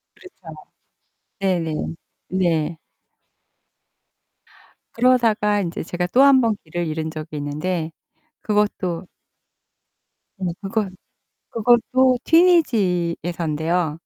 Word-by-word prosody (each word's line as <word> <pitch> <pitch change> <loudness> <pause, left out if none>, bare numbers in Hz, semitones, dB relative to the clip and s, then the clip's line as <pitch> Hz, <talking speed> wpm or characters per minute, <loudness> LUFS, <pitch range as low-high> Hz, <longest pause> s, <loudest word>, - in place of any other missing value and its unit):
그렇죠. 370 - -13 0.8
네네. 175 -5 0 0.6
네. 165 -3 0 2.2
그러다가 225 -4 +3
인제 170 -3 -4
제가 175 +1 -3
또 250 +9 +3
1 275 -2 +6
번 225 -3 +1
길을 170 +1 -4
잃은 160 0 -3
적이 155 -1 -7
있는데 155 +3 -3 0.5
그것도 195 -4 -1 1.3
네 185 - -3
그것 200 0 -2 0.6
그것도 245 +3 +3
튀니지에서인데요. 175 - +2
185 Hz, 180 characters per minute, -21 LUFS, 165-230 Hz, 2.2 s, 1